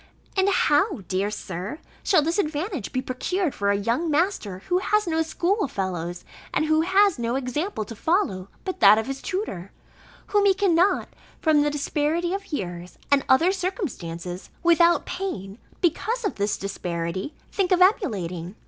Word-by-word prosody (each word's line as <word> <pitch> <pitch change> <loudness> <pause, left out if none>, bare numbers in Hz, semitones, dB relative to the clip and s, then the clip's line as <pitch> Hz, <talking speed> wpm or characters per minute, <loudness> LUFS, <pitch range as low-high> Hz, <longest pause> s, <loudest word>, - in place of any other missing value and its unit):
And 385 0 +3
how, 330 - +2
dear 195 +2 0
Sir, 190 - -5 0.2
shall 340 -6 +3
this 330 +6 0
advantage 315 - -2
be 255 - -2
procured 320 +6 -1
for 200 0 -1
a 200 - +3
young 235 +11 0
master, 290 - 0
who 360 0 +2
has 425 +2 +1
no 325 -2 +1
school 350 +4 0
fellows 175 -5 -4 0.3
and 310 - +1
who 315 0 +3
has 380 -1 +3
no 235 +1 -1
example 270 - -2
to 230 - -9
follow, 205 - 0 0.2
but 375 - -4
that 200 +2 +8
of 220 - 0
his 270 0 -5
tutor, 365 - -4 0.5
whom 410 -1 +2
he 385 - +4
cannot, 380 -1 +2 0.3
from 310 -2 +4
the 295 - +2
disparity 300 +4 -1
of 395 -1 -5
years, 180 - -5
and 280 -1 +4
other 320 +8 +5
circumstances, 190 - -4
without 340 0 +4
pain 220 - -5 0.2
(because 440 +8 0
of 405 - 0
this 205 +1 -1
disparity), 180 - -4 0.2
think 385 -2 0
of 365 - +4
emulating? 195 - +1
295 Hz, 160 wpm, -24 LUFS, -, 0.5 s, that